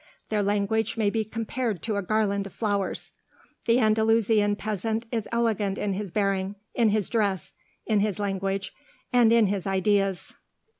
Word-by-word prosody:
Their 215 -1 +1
language 205 +2 0
may 210 -2 +2
be 220 0 0
compared 225 -3 -3
to 220 -2 -1
a 200 - 0
garland 200 0 0
of 195 - -14
flowers. 205 -3 -2 0.6
The 230 +1 +5
Andalusian 220 -2 +3
peasant 215 +2 -2
is 225 -3 -2
elegant 220 -4 0
in 200 -1 -1
his 200 +1 -4
bearing, 195 0 0 0.2
in 230 -3 +3
his 210 -1 +1
dress, 200 -6 -1 0.3
in 215 -2 +2
his 205 -1 0
language, 195 -1 -2 0.4
and 240 -2 +5
in 230 -1 +5
his 200 -1 -1
ideas." 195 0 +1
210 Hz, 155 wpm, -26 LUFS, 195-220 Hz, 0.6 s, The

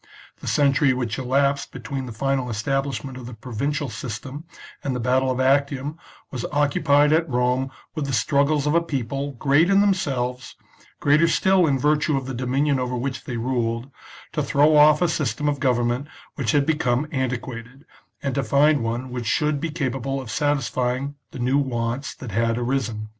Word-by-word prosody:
The - - -9
cen 140 -2 +3
tury 135 -1 +3
which 120 -2 -2
elapsed 140 +2 +1
between 135 +1 -5
the - - -6
final 135 +2 -1
establishment 135 +2 -2
of 120 - -9
the 125 - -8
provincial 140 +6 -3
system 130 +6 -6 0.4
and 135 -2 -2
the - - -2
battle 130 +2 +2
of 130 0 -1
Actium 140 +3 +1 0.3
was 125 -3 -4
occupied 145 0 +3
at 165 0 +2
Rome 125 +1 +1 0.2
with 155 -3 -3
the - - -2
struggles 140 +5 +2
of 150 - +1
a 170 - +4
people, 140 -2 -3
great 145 +7 +3
in 195 0 +5
themselves, 135 -11 0 0.4
greater 150 +3 +4
still 185 +1 +3
in 140 -2 +2
virtue 150 +2 +2
of 135 - -4
the 135 - -5
do 125 +1 -4
minion 140 +2 +1
over 125 0 -2
which 130 +2 -4
they 120 - -4
ruled, 120 +1 -2 0.4
to - - 0
throw 150 +2 +3
off 150 +2 +6
a - - +4
system 150 -2 -1
of 145 -1 0
government 125 +1 0 0.3
which 125 -7 -1
had 145 -1 +3
become 145 -4 +1
antiquated, 125 0 -4 0.4
and 140 -2 -1
to 140 - 0
find 140 +2 +3
one 120 +3 -3
which 120 -2 -4
should 150 +4 +1
be 170 - -2
capable 135 -3 -2
of 130 -4 -7
satisfying 135 -1 -1 0.2
the - - -10
new 130 +3 +2
wants 125 0 -2
that 125 -5 -8
had 115 +2 +1
arisen. 120 -4 -2
135 Hz, 180 wpm, -23 LUFS, 125-145 Hz, 0.4 s, off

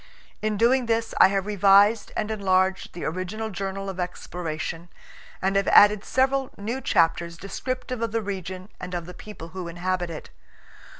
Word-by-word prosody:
In 215 -1 -1
doing 245 +3 +3
this 225 -1 0
I - - +9
have 195 0 -1
revised 205 +1 +4
and 215 - -1
enlarged 190 -2 +1
the 175 - -6
original 185 +6 -3
journal 195 +1 -4
of 190 -1 -5
exploration, 175 -1 -5 0.5
and 195 +1 +1
have 195 0 +2
added 205 0 +6
several 265 0 +1
new 230 +6 -4
chapters 170 -2 +1
descriptive 255 +5 -4
of 230 -2 -1
the 225 0 -1
region 185 -1 -5
and 180 0 -6
of 170 -1 -4
the 180 - -9
people 180 -4 -10
who 180 0 -6
inhabit 175 +1 -2
it. 160 -2 -8
195 Hz, 165 wpm, -25 LUFS, 180-215 Hz, 0.5 s, I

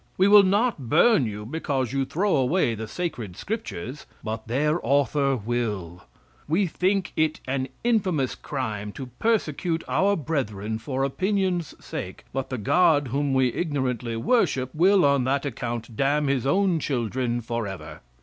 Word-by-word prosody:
We 190 - +5
will 205 0 +9
not 200 - +1
burn 175 - +5
you 105 0 -6
because 135 -2 -2
you 135 -1 +1
throw 190 +8 +1
away 135 -1 +2
the 110 0 -5
sacred 120 - -4
scriptures; 150 - -5 0.2
but 110 0 -5
their 150 +7 +1
Author 140 -1 +2
will," 105 -6 -3 0.4
"We 170 +7 +2
think 185 +2 0
it 155 0 +1
an 130 0 -1 0.2
infamous 185 - +1
crime 105 -7 -4
to 130 -3 -8
persecute 170 -6 0
our 200 +1 +2
brethren 110 - -2
for 130 +3 -2
opinion's 185 +2 0
sake; - - -6
but 135 -1 -3
the 130 - -3
God 145 - +3
whom 140 +1 0
we 130 -2 +3
ignorantly 130 -8 -2
worship 130 - +1
will 185 +2 +4
on 140 -2 +3
that 140 +2 0
account 120 -3 -4
damn 145 +4 +2
his 135 -2 0
own 185 +2 +2
children 120 -3 -1
forever." 115 -5 -5
140 Hz, 150 wpm, -25 LUFS, 120-175 Hz, 0.4 s, will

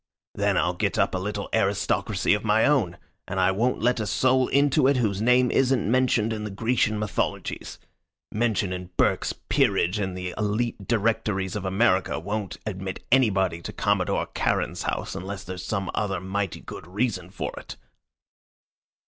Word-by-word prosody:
Then - - +1
I'll - - +2
get - - -1
up - - +2
a 95 - -1
little 100 +1 -3
aristocracy 100 -2 +1
of 105 - -1
my 110 0 +3
own, 110 -13 +2 0.3
and 95 - -3
I 95 0 +4
won't 115 +5 0
let 120 0 +2
a 110 - -2
soul 130 +5 +3
into 140 -1 +3
it 140 -1 +3
whose 105 -5 0
name 125 +1 +4
isn't 130 -5 +2
mentioned 125 -3 +2
in 105 -1 -4
the 105 - -4
Grecian 110 +1 +1
mythologies. 105 -2 -3 0.5
Mention 105 -4 0
in 90 -1 -6
Burke's - - +2 0.2
peerage 90 +5 +2
and 95 -2 -2
the 90 -1 -4
Elite 105 -1 -1
directories 105 -4 0
of 100 -2 -3
America 95 -1 +2
won't 100 +2 -4
admit 95 -3 -5
anybody 95 -9 +3
to - - -6
Commodore - - 0
Charon's - - 0
house - - -3
unless 95 +2 -6
there's 90 -1 -6
some 95 -1 -2
other 100 -3 -1
mighty 95 0 -3
good - - -9
reason 95 -2 -2
for 95 - -5
it." - - -9
105 Hz, 165 wpm, -25 LUFS, 95-115 Hz, 0.5 s, I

